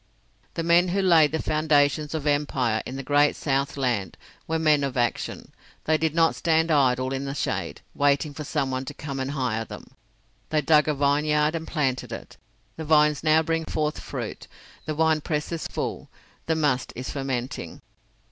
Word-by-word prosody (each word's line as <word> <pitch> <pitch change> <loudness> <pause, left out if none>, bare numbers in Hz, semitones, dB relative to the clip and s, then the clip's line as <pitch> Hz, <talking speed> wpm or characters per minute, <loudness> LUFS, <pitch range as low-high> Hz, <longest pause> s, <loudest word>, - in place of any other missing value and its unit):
The 165 - -2
men 170 +2 +4
who 195 +3 0
laid 165 -5 +5
the 160 - -1
foundations 150 -1 +1
of 155 -2 -4
empire 140 -6 +1
in 130 - -6
the 135 - -5
Great 145 +2 +3
South 140 -1 -1
Land 120 -8 -1 0.3
were 160 - 0
men 155 -3 +3
of 135 -2 -2
action. 120 -1 -2 0.3
They 160 - +2
did 160 -1 0
not 165 -1 +4
stand 160 0 +1
idle 130 -3 +2
in 135 +1 -3
the 135 0 -4
shade, - - -3
waiting 145 +1 +1
for 150 - -6
someone 130 -2 -2
to - - -7
come 140 -3 -5
and 130 0 -2
hire 125 -6 -1
them. - - -11 0.6
They 155 -1 +1
dug 150 +1 +4
a 150 - +1
vineyard 150 +2 +2
and 165 -1 -4
planted 130 -6 -1
it. - - -8 0.4
The 160 - -5
vines 150 -2 +3
now 155 0 +4
bring 165 0 -1
forth 150 -1 -2
fruit, - - -6 0.4
the 155 - -2
winepress 155 -1 0
is 165 -1 -3
full, - - -4 0.4
the 160 - +2
must 145 -5 0
is 125 +2 -5
fermenting. 130 - -4
150 Hz, 175 wpm, -25 LUFS, 135-155 Hz, 0.6 s, laid